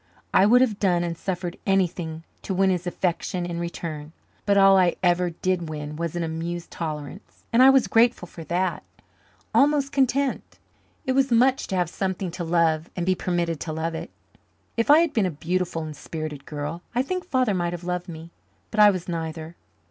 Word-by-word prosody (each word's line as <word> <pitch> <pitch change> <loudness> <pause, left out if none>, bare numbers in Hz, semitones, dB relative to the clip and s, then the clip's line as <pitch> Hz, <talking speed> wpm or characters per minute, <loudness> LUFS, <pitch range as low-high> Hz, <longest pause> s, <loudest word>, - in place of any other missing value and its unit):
I 190 - +6
would 245 +3 +6
have 225 -6 +1
done 175 -3 +2
and 170 -1 -3
suffered 175 0 -4
anything 175 -4 0 0.2
to 190 - -3
win 190 0 +3
his 180 -1 -2
affection 175 0 -2
in 170 -1 -4
return. 160 -3 -5 0.3
But 200 0 +4
all 195 0 +7
I 180 -2 +4
ever 175 0 +3
did 175 0 -2
win 150 -1 -6
was 170 +1 -3
an 175 - -1
amused 165 +2 -4
tolerance 155 +3 -7
and 235 - +5
I 265 - +9
was 270 -2 +5
grateful 230 -5 +2
for 165 - -10
that 180 +1 -1 0.7
almost 280 -1 +3
content. 275 0 0 0.5
It 260 - 0
was 270 +1 +2
much 255 +3 +3
to 190 - -3
have 180 -2 +1
something 190 +1 -3
to 175 +1 -5
love 165 -1 +1
and 175 - -2
be 185 - +3
permitted 175 -3 -1
to 160 - -4
love 160 +1 -2
it. - - -6 0.7
If 230 +3 0
I 300 +3 +8
had 335 -3 0
been 210 -5 +2
a - - -1
beautiful 170 +1 -2
and 155 -1 -7
spirited 155 -1 -7
girl 150 +3 -5
I 250 - +2
think 365 +5 -3
Father 255 -5 +2
might 175 -2 -1
have 175 0 -6
loved 180 +1 -3
me, 165 0 -9 0.4
but 215 - -3
I 210 0 +9
was 185 -3 -2
neither. 160 -1 -5
175 Hz, 195 wpm, -24 LUFS, 165-200 Hz, 0.7 s, I